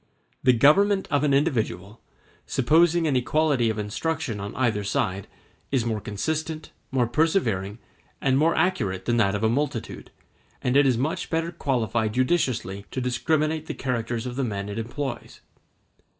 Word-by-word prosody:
The 130 -1 +5
government 190 - +4
of 145 0 +2
an 150 - +2
individual, 115 - 0 0.5
supposing 165 +6 +3
an 145 -4 +1
equality 125 0 +2
of 110 - -2
instruction 120 +3 -2
on 100 +2 -6
either 115 -5 0
side, 95 -1 -1 0.4
is 130 -4 +1
more 110 -2 -2
consistent, 155 +10 -3 0.2
more 130 -2 +1
persevering, 115 - 0 0.4
and 130 -1 +2
more 155 +4 +3
accurate 95 - 0
than 120 0 +1
that 100 -3 +2
of 105 - -3
a - - +4
multitude, 135 -1 -3 0.5
and 125 +1 -1
it 140 0 +6
is 125 -3 +2
much 145 +7 -2
better 165 +1 -1
qualified 115 -8 -1
judiciously 125 - 0
to - - -4
discriminate 155 +5 0
the - - -4
characters 120 -2 -2
of 125 0 -5
the 135 - 0
men 100 -4 -3
it 105 +2 -4
employs. 120 +2 -5
125 Hz, 155 wpm, -25 LUFS, 110-155 Hz, 0.5 s, it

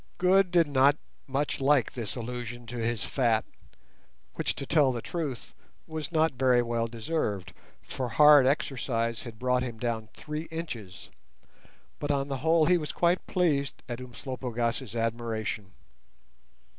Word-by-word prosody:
Good 185 +1 +4
did 170 -1 +4
not 140 0 +4 0.3
much 140 +1 -1
like 140 -2 +3
this 115 -4 -4
allusion 120 0 -5
to 120 +1 -7
his 115 -1 -1
fat, 115 -5 +1 0.9
which, - - -2
to 140 - -5
tell 145 -2 +4
the 120 - -3
truth, 145 -2 -5 0.3
was 155 -1 -5
not 160 -1 +3
very 125 -1 +3
well 115 -1 -1
deserved, 115 - -3 0.3
for 130 -2 -4
hard 145 +1 +7
exercise 120 -5 0
had 115 -3 -9
brought 125 +1 +1
him 120 -3 -4
down 110 -2 -3
three 150 +1 -5
inches; 120 - -7 0.9
but 145 - -3
on 140 -1 0
the 135 - -2
whole 160 +3 +3
he 175 +2 +4
was 150 - -4 0.4
pleased 150 -7 0
at 120 0 -5
Umslopogaas's 120 -2 -3
admiration. 115 -3 -2
125 Hz, 140 wpm, -28 LUFS, 115-150 Hz, 0.9 s, hard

